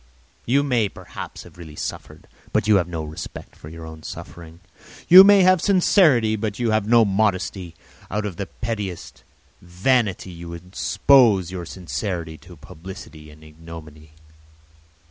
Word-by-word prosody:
You 140 +4 +2
may, 120 -7 +1
perhaps, - - -10
have - - -17
really 80 -3 -11
suffered, - - -7 0.2
but - - 0
you 105 -2 +5
have 90 -3 0
no 80 -2 -5
respect 75 0 -9
for 75 - -12
your 80 0 -10
own 80 -1 -11
suffering. 85 +1 -10 0.5
You 185 +2 +11
may 200 -1 +6
have 185 -2 +4
sincerity, 165 - +3
but 105 -1 -4
you 120 -2 0
have 110 -1 0
no 115 0 +5
modesty; 95 -3 -1 0.3
out 105 +1 -3
of 95 -5 -6
the 100 - -4
pettiest 105 -7 -6 0.4
vanity 95 +2 -1
you 85 0 -9
expose 95 +2 +2
your 90 -3 -6
sincerity 85 -1 -5
to 90 -1 -15
publicity 80 0 -12
and 75 +1 -17
ignominy. 80 -1 -13
95 Hz, 145 wpm, -22 LUFS, 80-110 Hz, 0.5 s, You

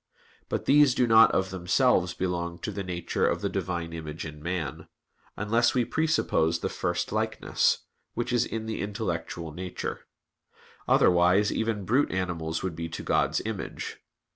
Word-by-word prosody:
But - - -2
these 145 -2 +5
do 125 - +3
not 115 -1 +7
of 95 0 0
themselves 90 +1 +2
belong 85 -2 -2
to - - -3
the 100 0 -4
nature 90 -2 -1
of - - 0
the - - -1
Divine 85 -2 -3
image 80 -1 -6
in 75 -1 -8
man, 85 -4 -4 0.5
unless 115 +4 +2
we 125 -2 +2
presuppose 120 - +1
the - - -1
first - - -2
likeness, - - 0 0.3
which 120 +1 -2
is 120 -1 +3
in 110 -2 -4
the 110 0 -3
intellectual 85 -6 -4
nature; 90 +3 -6 0.8
otherwise 90 +3 +4
even 110 -3 -1
brute 130 +9 +2
animals 85 -3 -2
would 95 -4 -3
be 85 0 -4
to 80 - -6
God's - - +1
image. - - -5
95 Hz, 155 wpm, -27 LUFS, 85-115 Hz, 0.8 s, not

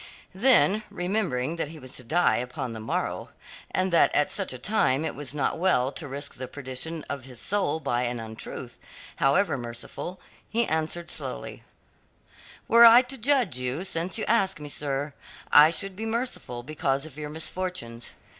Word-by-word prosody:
Then, 215 -1 +5
remembering 175 -6 -1
that 165 - -1
he 160 +2 -10
was 130 -3 -8
to 125 - -6
die 170 +9 +3
upon 125 -1 -4
the 110 - -6
morrow, 110 - -3 0.4
and 185 -1 0
that 170 - +6
at 145 - +3
such - - -1
a 130 - -2
time 150 - +1
it - - -2
was 145 -1 -4
not 145 +2 0
well 140 -8 +3
to 145 - -4
risk 140 +1 -3
the 130 0 -6
perdition 145 +4 -5
of 140 -3 -5
his 125 -3 -10
soul 195 -2 0
by 120 -5 0
an 120 0 -2
untruth, 110 0 -8 0.4
however 140 +2 +2
merciful, 120 +9 -6 0.3
he 235 +1 +2
answered 160 +2 -1
slowly: - - -5 1.1
"Were 235 +1 +7
I 235 +2 +10
to 265 +2 -6
judge 240 - +2
you, 125 +7 -2
since 180 0 -2
you 220 - -2
ask 195 -5 +2
me, 150 0 -7
sir, 145 0 -2 0.4
I 150 +1 +9
should 195 +3 -2
be 220 +3 -4
merciful 225 - -3
because 140 -1 -1
of 155 -4 -11
your 150 0 -5
misfortunes. 155 -7 -4
155 Hz, 175 wpm, -26 LUFS, 130-190 Hz, 1.1 s, I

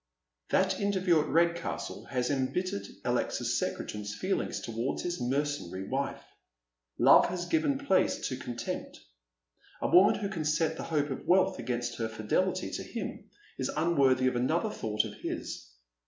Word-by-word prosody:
That 190 0 +2
interview 190 -5 +3
at - - -3
Redcastle 170 +1 0
has 125 0 -1
embittered 130 - -1 0.2
Alexis - - 0
Secretan's 105 -1 -4
feelings 190 - -1
towards 115 +3 -3
his 175 -5 -3
mercenary 125 -8 -2
wife. 135 +1 -2 0.7
Love - - +7
has 175 0 -3
given 305 - +1
place 275 -9 +1
to 130 - -2
contempt. 120 -2 -5 0.8
A - - 0
woman 185 +3 +6
who 205 - -2
could 165 -7 -2
set 160 +1 +1
the - - -6
hope 150 -3 0
of 135 - -5
wealth 190 +1 +4
against 120 -1 -2
her 115 -1 -1
fidelity 110 -1 0
to - - -3
him - - -6 0.3
is - - -1
unworthy 140 -6 +3
of 130 -1 +2
another 160 - +1
thought 105 - -1
of - - -6
his. - - -5
145 Hz, 150 wpm, -30 LUFS, 120-180 Hz, 0.8 s, Love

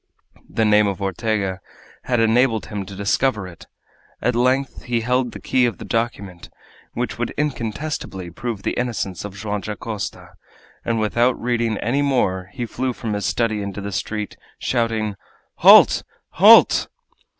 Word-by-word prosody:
The 110 - 0
name 105 0 +4
of 100 -1 -3
Ortega 100 -1 -2 0.5
had 120 -2 +1
enabled 115 0 +2
him 100 -3 -5
to 100 - -9
discover 100 +1 0
it! 85 -3 -13 0.5
At 125 +3 0
length 130 +2 +1
he 120 -1 0
held 125 +1 0
the - - -9
key 125 -1 +2
of 120 - -4
the - - -9
document, 100 -6 -3 0.4
which - - -3
would - - -1
incontestably 115 - -3
prove 110 +2 -5
the - - 0
innocence 115 -7 -3
of 100 -2 -7
Joam 105 0 -3
Dacosta, 105 0 -6 0.5
and 115 -1 -1
without 120 +4 +1
reading 115 -2 0
any 130 +6 0
more 100 -10 0
he 120 - -4
flew 125 +3 -3
from 110 -2 -4
his 105 -1 -2
study 110 -3 0
into 100 0 -5
the 100 0 -5
street, 105 +2 -4 0.2
shouting: 110 -4 -1 0.4
"Halt! - - +7 0.3
Halt!" - - +6
110 Hz, 150 wpm, -21 LUFS, 100-120 Hz, 0.5 s, Halt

